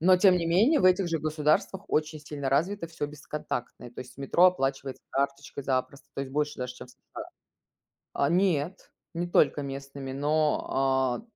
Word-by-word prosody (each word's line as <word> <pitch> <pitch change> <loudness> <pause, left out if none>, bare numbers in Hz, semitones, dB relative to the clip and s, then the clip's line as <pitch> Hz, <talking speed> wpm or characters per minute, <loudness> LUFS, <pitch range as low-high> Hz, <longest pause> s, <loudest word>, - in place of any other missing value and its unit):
но 185 +3 +6
тем 185 0 +5
не 170 - -2
менее, 215 - +4
в - - +1
этих 185 0 +4
же 165 -1 0
государствах 155 +5 0
очень 155 0 0
сильно 145 -2 -5
развито 170 +6 0
всё 165 -2 -5
бесконтактное. 145 -4 -6
То 120 - -16
есть 125 - -11
метро 140 +6 +3
оплачивается 135 -6 -1
карточкой 140 0 -2
запросто, 135 +1 -2
то - - -3
есть 135 -1 -8
больше 150 +1 -1
даже, 125 -1 -4
чем - - -10
в - - -17
США. - - -10 0.9
А, 140 - +1
нет, 175 -1 0 0.2
не 175 +1 -2
только 150 -4 +3
местными, 135 -1 -6
но, 150 +2 +1
а, 130 - +1
150 Hz, 175 wpm, -28 LUFS, 135-170 Hz, 0.9 s, но